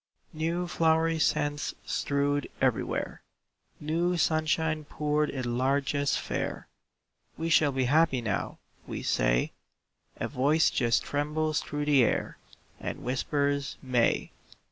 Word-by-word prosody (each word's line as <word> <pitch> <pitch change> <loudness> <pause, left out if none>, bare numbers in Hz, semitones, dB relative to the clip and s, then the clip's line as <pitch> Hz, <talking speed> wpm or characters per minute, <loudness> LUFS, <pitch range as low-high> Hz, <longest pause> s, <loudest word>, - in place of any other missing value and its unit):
New 165 +3 -1
flowery 165 -1 +2
scents 145 -1 0
strewed 145 0 0
everywhere, - - -1 0.6
New 170 +4 0
sunshine 155 0 +1
poured 150 0 0
in 120 -3 -2
largesse 140 +1 +1
fair, - - -4 0.7
"We 165 +1 -2
shall 150 -2 +4
be 135 -1 0
happy 150 0 +3
now," 110 -4 -2 0.3
we - - -5
say. - - +1 0.7
A - - -2
voice 145 +4 +2
just 120 -2 +2
trembles 150 +1 -1
through 145 0 -4
the 145 -4 +5
air, - - -1 0.4
And - - -5
whispers, 140 +2 -1
"May." 125 -3 +1
145 Hz, 115 wpm, -28 LUFS, 135-155 Hz, 0.7 s, the